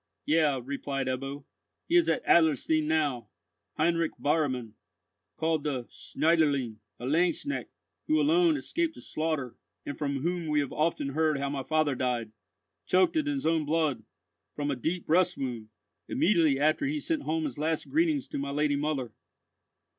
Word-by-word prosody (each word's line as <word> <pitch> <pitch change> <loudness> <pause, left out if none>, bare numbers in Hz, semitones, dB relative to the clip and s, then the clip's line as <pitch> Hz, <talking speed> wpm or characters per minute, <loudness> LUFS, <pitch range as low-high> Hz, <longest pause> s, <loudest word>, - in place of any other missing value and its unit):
"Yea," 150 -3 +3
replied 135 +1 -3
Ebbo, 135 +2 -4 0.4
"he 340 - +1
is 345 -1 +5
at 250 - 0
Adlerstein 155 -1 +3
now, 150 -6 0 0.5
Heinrich 165 0 +1
Bauermann, 130 -7 0 0.6
called 160 -2 0
the 135 -5 -2
Schneiderlein, 145 -8 +1 0.2
a 120 - -6
lanzknecht, 175 - 0 0.4
who 310 0 +3
alone 330 +1 +4
escaped 330 0 -2
the - - -11
slaughter, 155 -6 -2 0.3
and 145 - -4
from 140 -2 -2
whom 170 +1 -2
we 150 -1 +2
have 140 -2 -2
often 155 -2 0
heard 155 +1 +1
how 140 0 -2
my 140 -1 -2
father 155 +1 +1
died, 120 -4 -2 0.6
choked 185 - +3
in 310 -2 +1
his 280 -2 -2
own 160 -1 +2
blood, 150 -5 0 0.5
from 145 -1 -1
a - - -1
deep 165 +8 -2
breast 180 +2 +3
wound, 120 -5 -4 0.4
immediately 165 -7 +3
after 155 - +2
he 295 - -1
had 295 - -4
sent 320 -3 -1
home 160 +1 -1
his 145 -3 -4
last 160 +1 -1
greetings 315 -3 +1
to - - -4
my 140 0 -3
lady 145 0 +1
mother." 140 -5 -2
155 Hz, 160 wpm, -29 LUFS, 140-170 Hz, 0.6 s, is